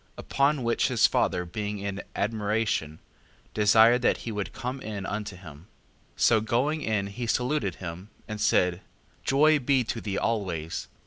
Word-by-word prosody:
Upon 140 Hz, -1 st, +1 dB
which 115 Hz, 0 st, +1 dB
his 125 Hz, -4 st, +3 dB
father 90 Hz, -2 st, +1 dB
being 105 Hz, +3 st, -4 dB
in 100 Hz, 0 st, -4 dB
admiration, 105 Hz, -7 st, -1 dB, 0.6 s
desired 110 Hz, +3 st, +5 dB
that -, -, +2 dB
he 115 Hz, -, -3 dB
would 105 Hz, -2 st, -4 dB
come 130 Hz, +2 st, -5 dB
in 105 Hz, -4 st, -5 dB
unto 105 Hz, -1 st, -4 dB
him. 80 Hz, -2 st, -13 dB, 0.5 s
5:11. -, -, -9 dB
So 110 Hz, -2 st, +5 dB
going 130 Hz, +8 st, 0 dB
in 105 Hz, -5 st, 0 dB
he 115 Hz, +5 st, -5 dB
saluted 125 Hz, -4 st, 0 dB
him, 90 Hz, +3 st, -8 dB, 0.2 s
and 110 Hz, -1 st, -5 dB
said: 90 Hz, 0 st, +2 dB, 0.4 s
Joy 150 Hz, +3 st, +4 dB
be 135 Hz, -1 st, +2 dB
to 115 Hz, 0 st, -4 dB
thee 100 Hz, -2 st, -3 dB
always. 90 Hz, -8 st, -2 dB
110 Hz, 155 wpm, -27 LUFS, 100-120 Hz, 0.6 s, desired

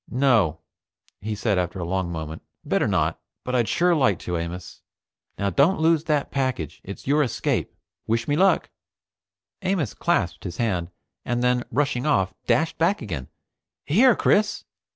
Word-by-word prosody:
"No," 115 Hz, -, +2 dB, 0.6 s
he 105 Hz, +1 st, -4 dB
said 105 Hz, -2 st, +1 dB
after 90 Hz, +1 st, -2 dB
a 90 Hz, -, -3 dB
long 90 Hz, 0 st, -1 dB
moment. 80 Hz, -1 st, -5 dB, 0.2 s
"Better -, -, +1 dB
not. -, -, 0 dB, 0.2 s
But 125 Hz, -, -4 dB
I'd 120 Hz, -3 st, +2 dB
sure 175 Hz, 0 st, +3 dB
like 130 Hz, -, +3 dB
to, 90 Hz, -, -3 dB
Amos. 85 Hz, +2 st, -5 dB, 0.6 s
Now 100 Hz, 0 st, 0 dB
don't 155 Hz, -, +3 dB
lose 160 Hz, 0 st, +3 dB
that 150 Hz, -3 st, 0 dB
package. 130 Hz, -, -2 dB
It's 100 Hz, -, -9 dB
your 145 Hz, +3 st, +3 dB
escape. 130 Hz, -6 st, -1 dB, 0.4 s
Wish 115 Hz, +1 st, 0 dB
me 145 Hz, -, +1 dB
luck." 190 Hz, +4 st, +3 dB, 0.9 s
Amos 185 Hz, -, -1 dB
clasped -, -, 0 dB
his 85 Hz, -, -6 dB
hand, 90 Hz, -8 st, -1 dB, 0.3 s
and 120 Hz, 0 st, -1 dB
then, 125 Hz, 0 st, +2 dB
rushing 140 Hz, +1 st, 0 dB
off, 95 Hz, -10 st, +2 dB
dashed 125 Hz, +7 st, +1 dB
back 170 Hz, -1 st, +2 dB
again. 80 Hz, -, -5 dB, 0.6 s
"Here, 230 Hz, -, +5 dB
Chris. 210 Hz, +1 st, +2 dB
120 Hz, 155 wpm, -24 LUFS, 95-150 Hz, 0.9 s, Here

